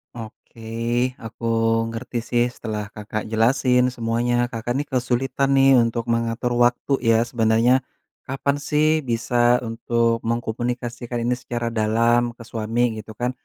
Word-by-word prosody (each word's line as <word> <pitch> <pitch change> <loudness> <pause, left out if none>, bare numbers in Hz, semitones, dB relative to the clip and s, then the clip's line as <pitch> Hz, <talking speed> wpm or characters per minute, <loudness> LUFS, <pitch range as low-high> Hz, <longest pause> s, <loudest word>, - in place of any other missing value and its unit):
Oke, 115 0 -11 0.6
aku 115 +1 -10 0.5
ngerti 120 +1 -5
sih 120 -1 +3
setelah 105 -2 -4
Kakak 105 0 -4
jelasin 125 +2 +3
semuanya. 120 +1 0
Kakak 115 +1 -4
nih 145 - -3
kesulitan 130 +2 0
nih 135 0 +6
untuk 115 0 -2
mengatur 115 +1 -1
waktu 120 +3 +1 0.2
ya 115 0 +5
sebenarnya, 115 +1 +3 0.5
kapan 135 +1 -1
sih 150 +1 +3 0.2
bisa 120 +1 +2
untuk 115 0 0
mengkomunikasikan 120 +1 -3
ini 125 +1 +1
secara 120 -1 -4
dalam 115 +2 +2
ke 115 - -10
suami 115 +1 -2 0.2
gitu 110 0 -8
kan. 125 +1 0
120 Hz, 130 wpm, -22 LUFS, 115-125 Hz, 0.6 s, nih